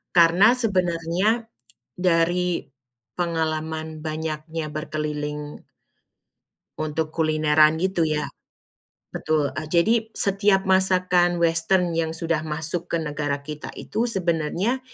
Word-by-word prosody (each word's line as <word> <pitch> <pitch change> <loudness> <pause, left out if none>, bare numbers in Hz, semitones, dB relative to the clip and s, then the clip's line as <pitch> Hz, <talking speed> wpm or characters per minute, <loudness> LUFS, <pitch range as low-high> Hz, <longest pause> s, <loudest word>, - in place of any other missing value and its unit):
Karena 175 +7 +6
sebenarnya 185 +1 0 0.5
dari 175 -1 +1 0.5
pengalaman 160 -2 -3
banyaknya 155 0 -4
berkeliling 150 -1 -4 1.1
untuk 155 0 -3
kulineran 155 -1 +3
gitu 190 -1 0
ya. 150 -2 0 0.9
Betul, 145 -3 0
ah, 155 0 -5
jadi 220 +7 +2
setiap 195 -1 +3
masakan 185 -2 +3
western 170 +2 +2
yang 165 -1 0
sudah 165 -2 -1
masuk 160 +3 -2
ke 170 - +1
negara 145 -2 -3
kita 150 0 -7
itu 235 +2 -2
sebenarnya 185 - -1
165 Hz, 95 wpm, -23 LUFS, 155-180 Hz, 1.1 s, Karena